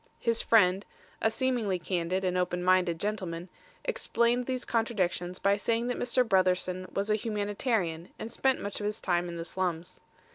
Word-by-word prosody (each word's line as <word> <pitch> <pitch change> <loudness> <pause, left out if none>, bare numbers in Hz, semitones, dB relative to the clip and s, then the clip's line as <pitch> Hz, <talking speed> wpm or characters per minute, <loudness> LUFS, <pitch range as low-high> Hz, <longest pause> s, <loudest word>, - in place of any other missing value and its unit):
His 230 -1 +2
friend 195 -3 +4 0.4
a 220 - +4
seemingly 225 -5 0
candid 180 +1 -1
and 180 0 0
open 180 -1 0
minded 180 -2 +3
gentleman 185 -4 -3 0.4
explained 240 +1 +1
these 255 -1 -2
contradictions 185 -6 -1
by 200 0 +2
saying 230 +3 0
that 245 - -2
Mr. 250 0 +2
Brotherson 185 -1 +1
was 200 +2 -1
a - - +4
humanitarian 205 -5 -1
and 225 - -6
spent 265 +2 +1
much 200 0 -4
of 205 - -2
his 210 +1 -3
time 175 -1 0
in 170 - -6
the 165 - -4
slums. 180 -1 -3
195 Hz, 170 wpm, -29 LUFS, 180-225 Hz, 0.4 s, friend